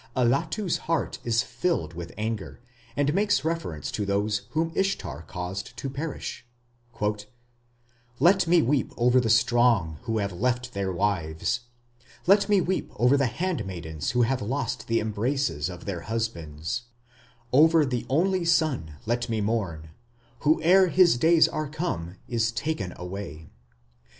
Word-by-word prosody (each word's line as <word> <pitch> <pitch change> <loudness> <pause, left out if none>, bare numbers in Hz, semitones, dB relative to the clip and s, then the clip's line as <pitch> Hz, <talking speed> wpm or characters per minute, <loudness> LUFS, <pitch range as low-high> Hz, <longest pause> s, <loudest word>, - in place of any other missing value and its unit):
Allatu's 140 - +1
heart 165 - 0
is 115 +1 +2
filled 120 - -1
with 85 0 -7
anger, 110 -4 -4 0.4
and 145 +1 +2
makes 205 -6 +2
reference 160 - -3
to 105 - -2
those 100 +1 -1
whom 165 +1 0
Ishtar 135 - -1
caused 90 +2 -6
to 135 - -4
perish: 140 -3 -5 1.8
Let 185 +1 +4
me 170 -1 +5
weep 135 +1 0
over 125 +1 +4
the 120 -3 0
strong 115 -8 +3
who 115 -2 -1
have 100 -2 -1
left 125 +6 -1
their 100 -1 -1
wives, 90 +1 -1 0.7
Let 200 +2 +5
me 205 -2 +5
weep 185 +2 -2
over 125 +3 +4
the 140 -2 +2
handmaidens 95 - -3
who 125 0 +2
have 130 +2 0
lost 125 +1 -3
the 115 0 +2
embraces 110 - -1
of 90 -1 -9
their 90 -4 -4
husbands, 85 -2 -3 0.7
Over 160 +3 +6
the 125 -3 -3
only 180 +6 +2
son 155 - +1
let 120 +2 -1
me 110 -1 0
mourn, 95 -8 -2 0.5
who 155 +1 +3
ere 185 +3 +6
his 175 -1 +5
days 160 +4 +5
are 155 -1 -3
come 120 - -3
is 115 -1 0
taken 115 - -3
away. 90 -4 -7
120 Hz, 140 wpm, -26 LUFS, 100-155 Hz, 1.8 s, Over